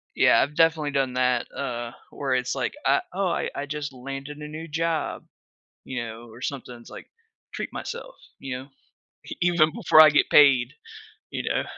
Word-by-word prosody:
Yeah. - - +5
I've 145 +2 0
definitely 160 -3 +3
done 135 -2 0
that, 125 -1 +1
uh, 120 -3 -4 0.2
where 135 -2 -2
it's 125 0 0
like, - - -2
"Ah, 375 - +4
oh, 195 -2 0
I - - -1
I 140 - -4
just 145 -1 -4
landed 135 +3 -7
a 150 0 -7
new 160 +2 -7
job," 165 0 -2 0.6
you 130 -2 -4
know, 115 +1 -9
or 115 +2 -13
something 130 -2 -5
it's, 120 - -15
like, - - -10 0.4
"Treat - - -5
myself," - - -7 0.2
you 135 -2 -5
know? 130 +2 -11 0.6
E - - -7
even 170 -3 +4
before 180 -8 +7
I 155 - +8
get 150 - +2
paid, 140 -3 +6 0.6
you - - -3
know? - - 0
140 Hz, 185 wpm, -25 LUFS, 125-155 Hz, 0.6 s, I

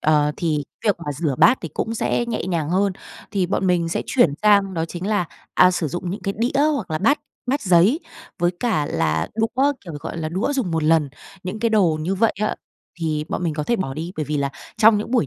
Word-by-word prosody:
Ờ, 150 -1 +3
thì 155 -4 -1 0.2
việc 205 -3 +3
mà 145 - -2
rửa 145 -1 -1
bát 165 +11 +6
thì 165 - -5
cũng 225 - -2
sẽ 240 +1 0
nhẹ 235 - -2
nhàng 165 -4 -1
hơn. 195 +2 +2 0.4
Thì 195 -4 0
bọn 190 0 0
mình 175 -2 +2
sẽ 165 - -1
chuyển 175 - +3
sang 200 -3 +4
đó 165 0 0
chính 175 +2 -6
là, 205 -4 +1 0.3
à, 180 0 +6
sử 175 -3 -1
dụng 175 +2 -4
những 200 - -4
cái 195 -1 -2
đĩa 255 +5 +1
hoặc 205 -11 -4
là 155 - 0
bát 280 +9 +2 0.3
bát 275 +3 0
giấy 185 - +4 0.4
với 175 0 +2
cả 195 -12 +1
là 80 0 0
đũa, 260 +6 +2
kiểu, 170 - -9
gọi - - -6
là, 160 -2 -3
đũa 190 - -1
dùng 260 -11 -1
một 160 -1 0
lần, 155 -2 +3 0.3
những 185 +4 -5
cái 235 - +2
đồ 175 -8 +3
như 175 +5 -1
vậy 225 +3 +2
á, 215 - 0 0.4
thì 155 -2 -1
bọn - - -3
mình 165 -3 -1
có 150 - -2
thể 235 - +1
bỏ 135 -10 -3
đi. 165 +4 -5
Bởi 155 - -1
vì 150 +1 -2
là 140 -1 0 0.3
trong 220 -1 +6
những 215 - -5
buổi 245 - +2
180 Hz, 245 wpm, -22 LUFS, 155-215 Hz, 0.4 s, bát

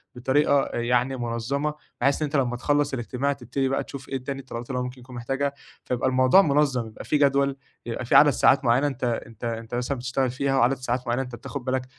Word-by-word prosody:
بطريقة 135 +3 +2
أ - - -6
يعني 125 +2 +1
مُنظّمة 120 +5 -2 0.3
بحيث 140 +2 +2
إن - - +2
أنت 150 +1 -4
لمّا 125 -3 +1
تخلّص 145 +2 +1
الإجتماع 130 +3 -1
تبتدي 130 +1 -2
بقى 135 - 0
تشوف 135 -1 -9
إيه 135 -2 -4
تاني 135 +1 -4
الطلبات 120 -2 -8
اللي 130 -1 -1
هو - - -1
ممكن 125 0 -7
يكون 125 +1 -12
محتاجها، 135 +4 -1 0.3
فيبقى 125 +1 0
الموضوع 130 +8 +5
منظَّم، 140 -6 +1
يبقى 110 - -10
في 150 - +1
جدول، 140 -1 +2 0.3
يبقى 120 +1 -4
فيه - - +1
عدد 150 - +8
ساعات 135 0 +3
معيّنة 125 +5 +3
أنت 135 -3 -5 0.2
أنت 115 0 -16
أنت 115 0 -4
مثلًا 125 +3 -2
بتشتغل 125 +1 -1
فيها 135 +1 0
وعدد 130 +1 +3
ساعات 125 -1 -3
معيّنة 120 +2 0
أنت 125 -2 -8
بتاخد 130 +2 -7
بالك 130 0 -1
130 Hz, 220 wpm, -25 LUFS, 120-140 Hz, 0.3 s, عدد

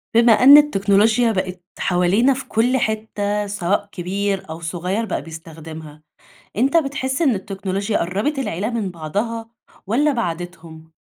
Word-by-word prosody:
بما 235 0 +6
أن 270 +6 +8
التكنولوجيا 220 -3 +3
بقت 185 -3 -3 0.2
حوالينا 190 +9 +2
في 265 +1 -7
كل 245 +4 +1
حتة 210 -2 -2
سواء 200 0 -1
كبير 195 +1 -3
أو 160 +1 -6
صغيّر 180 +6 -2
بقى 205 - -3
بيستخدمها. 160 -2 -10 0.5
أنت 270 +8 +3
بتحس 275 -2 -1
إن 275 -8 +3
التكنولوجيا 195 +1 -3
قرّبت 205 - -1
العيلة 210 -4 -2
من 220 -6 -3
بعضها 210 +8 -4 0.4
والّا 285 +9 +2
بعدتهم؟ 165 -6 -6
200 Hz, 130 wpm, -20 LUFS, 175-230 Hz, 0.5 s, أن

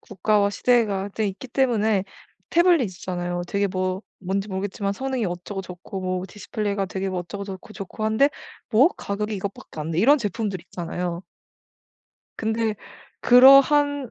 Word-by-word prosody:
국가와 205 0 +1
시대가 205 -4 +1
되 210 +1 -2
있기 200 +6 -6
때문에 220 -6 +1 0.5
태블릿이 345 -4 +4 0.2
있잖아요. 175 -1 -3
되게 200 0 +1
뭐 185 0 -2 0.2
뭔지 195 +2 -2
모르겠지만 200 +1 -2
'성능이 265 +1 -2
어쩌고 180 +3 -5
좋고 180 +2 -8
뭐 185 0 -2
디스플레이가 205 0 -3
되게 190 +1 -3
뭐 185 -1 -2
어쩌고 200 +3 -6
좋고, 195 +2 -9
좋고 215 +1 -6
한데 220 +7 +3 0.4
뭐? 245 +7 +6
가격이 210 +2 -3
이것밖에 195 -4 -7
안 155 +2 -4
돼?' 165 - -1
이런 280 +10 +5
제품들이 205 -4 -3
있잖아요. 175 0 -4 1.1
근데 220 0 -1 0.5
그러한 275 +1 +6
200 Hz, 350 characters per minute, -24 LUFS, 185-230 Hz, 1.1 s, 뭐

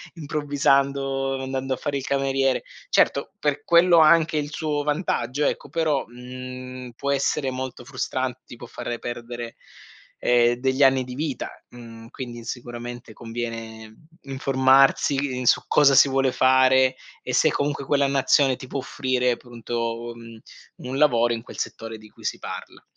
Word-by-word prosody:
improvvisando, 140 -3 0
andando 130 0 -3
a - - -14
fare 145 +2 -2
il 135 - -5
cameriere. 135 -1 +1 0.3
Certo - - +2
per 145 -1 -1
quello 170 +1 +5
anche 160 0 +5
il 145 0 -2
suo 150 -1 -2
vantaggio 145 -3 -1
ecco - - -2
però, 155 -4 0
mhmm, 125 +1 -9
può 140 +3 -2
essere 140 0 0
molto 130 -1 -6
frustrante, 130 -1 -3
ti - - -11
può 120 - -10
fare 120 0 -5
perdere, 120 0 -6 0.6
ehm, 120 0 +3
degli 130 +2 -1
anni 135 -1 +4
di 125 - -8
vita, 150 -2 -3 0.2
mhmm, 115 -2 -12
quindi 120 -3 -8
sicuramente 120 -1 -7
conviene, 115 -1 -6
mhmm, 110 - -21 0.3
informarsi 135 0 +3
su - - +4
cosa 140 -2 +5
si 135 +1 +7
vuole 135 -1 +2
fare 130 0 +4 0.3
e 125 - -5
se 155 +3 +4
comunque 140 -1 -2
quella 140 0 +2
nazione 135 0 +3
ti 130 - -10
può 140 - -4
offrire 130 -1 -1
appunto 120 -1 -5 0.3
u 115 - -11
mhmm, 115 -1 -12 0.5
un 130 - -3
lavoro 120 -5 +3
in 115 0 -5
quel - - -10
settore 115 0 -5
di 110 0 -15
cui - - -19
si - - -3
parla. - - -8
130 Hz, 155 wpm, -24 LUFS, 120-140 Hz, 0.6 s, si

